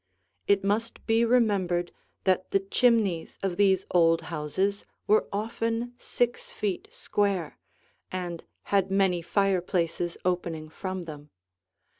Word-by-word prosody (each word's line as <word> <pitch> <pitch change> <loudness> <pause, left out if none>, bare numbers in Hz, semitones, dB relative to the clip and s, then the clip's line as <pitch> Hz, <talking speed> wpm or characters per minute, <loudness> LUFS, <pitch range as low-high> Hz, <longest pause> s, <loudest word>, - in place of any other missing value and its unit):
It 200 -1 +3
must 215 +4 -1
be 225 +1 +3
remembered 200 -8 +2 0.3
that 185 -1 +1
the 195 - +3
chimneys 200 -4 +2
of 190 -2 0
these 190 -1 +3
old 165 -2 +4
houses 185 +7 -1 0.2
were 215 - +3
often 230 +3 -2
six 240 -1 -1
feet 210 - -3
square 200 - -1 0.5
and 175 -2 -4 0.3
had 195 -1 +3
many 190 -3 +2
fireplaces 175 -2 0
opening 170 -3 -1
from 185 +1 -5
them. 150 -2 -9
190 Hz, 115 wpm, -27 LUFS, 175-210 Hz, 0.5 s, old